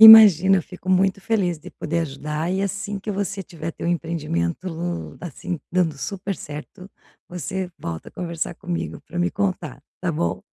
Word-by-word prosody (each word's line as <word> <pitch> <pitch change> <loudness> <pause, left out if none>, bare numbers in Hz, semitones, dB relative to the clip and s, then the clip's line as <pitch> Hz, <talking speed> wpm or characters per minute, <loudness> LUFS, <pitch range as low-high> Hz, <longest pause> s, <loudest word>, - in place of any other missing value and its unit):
Imagina, 195 -5 +11
fico 180 +2 -10
muito 190 +1 +4
feliz 190 -6 +1
de - - -10
poder 165 +2 -2
ajudar 150 +2 -2
e 190 +1 +1
assim 200 +1 -2
que 210 +2 -4
você 195 0 -1
tiver 165 -3 -5
teu - - -5
empreendimento, 165 - -1 0.4
assim, 170 -1 -4
dando 165 -5 +2
super 195 +2 -3
certo, 150 +6 -8 0.4
você 180 +2 -3
volta 80 -1 -5
a - - -21
conversar 170 -1 -3
comigo 175 -1 -3
para 175 - -5
me 175 +1 +2
contar, 185 -7 -2 0.2
tá 180 -2 +1
bom. 85 - 0
175 Hz, 160 wpm, -24 LUFS, 160-190 Hz, 0.4 s, Imagina